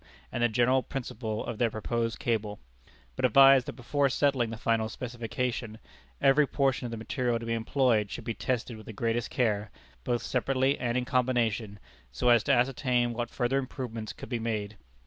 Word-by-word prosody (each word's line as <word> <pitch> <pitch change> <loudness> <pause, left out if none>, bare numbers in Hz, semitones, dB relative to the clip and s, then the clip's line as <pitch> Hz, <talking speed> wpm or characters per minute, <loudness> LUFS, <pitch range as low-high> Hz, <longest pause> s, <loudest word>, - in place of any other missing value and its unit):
and - - -3
the 120 - +4
general 125 +3 +3
principle 115 -5 -4
of 115 - -5
their 120 - +3
proposed 115 +1 -2
cable; 105 -3 -2 0.6
but - - -5
advised 135 +1 +7
that - - -4
before 140 +3 0
settling 135 -3 +1
the 115 - -6
final 115 -1 0
specification, 120 -1 -4 0.4
every 135 +2 +4
portion 135 -3 0
of - - -3
the 115 - -4
material 120 +1 -1
to 115 - -7
be 115 - -1
employed 115 -2 +1
should 120 - -6
be 115 - -3
tested 120 0 -2
with 110 - -13
the 110 - -7
greatest 115 +2 -1
care, 110 -3 0 0.3
both 120 -1 -1
separately 130 +2 +1
and 120 0 0
in 125 - -1
combination, 120 -5 0 0.3
so 125 - +1
as 120 -2 +6
to - - 0
ascertain 125 -1 +2
what 120 0 -3
further 130 +2 0
improvements 125 -5 -5
could - - -10
be 120 -2 -2
made. 110 -2 -3
120 Hz, 185 wpm, -29 LUFS, 115-130 Hz, 0.6 s, advised